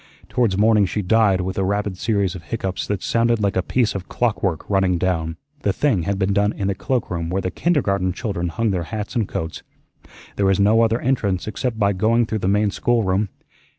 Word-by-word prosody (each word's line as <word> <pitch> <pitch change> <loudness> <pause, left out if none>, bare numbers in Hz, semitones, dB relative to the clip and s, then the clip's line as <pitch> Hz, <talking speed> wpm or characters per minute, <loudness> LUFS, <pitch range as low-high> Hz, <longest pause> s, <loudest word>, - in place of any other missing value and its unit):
Towards 115 -6 +1
morning 105 -1 +4
she 105 +2 -2
died 100 -1 +3
with 95 +1 -3
a - - +1
rapid 100 0 -1
series 100 -2 0
of 95 - -8
hiccoughs 95 0 -3
that 100 -2 -2
sounded 115 0 +2
like 100 -2 0
a 95 - +2
piece 115 +3 0
of 95 -2 -6
clockwork 100 -8 -1
running 95 -3 +2
down. 80 -2 -1 0.2
The 100 - +1
thing 100 - +1
had 100 - 0
been 95 0 +1
done 105 +1 +2
in 100 - -3
the - - +1
cloakroom 90 -7 -2
where 95 +2 0
the 95 - -2
kindergarten 100 - +1
children 95 -2 -3
hung 110 +6 -1
their 90 -3 -2
hats 110 +1 -5
and 110 -5 +1
coats. 80 0 -4 0.8
There 100 - +2
was 95 +1 +2
no 105 +3 +4
other 115 +1 +2
entrance 105 -8 0
except 110 +2 -2
by 100 -2 +2
going 115 +5 +2
through 110 0 -2
the 95 - -2
main 105 +1 +2
schoolroom. 105 -4 +1
100 Hz, 210 wpm, -21 LUFS, 95-110 Hz, 0.8 s, morning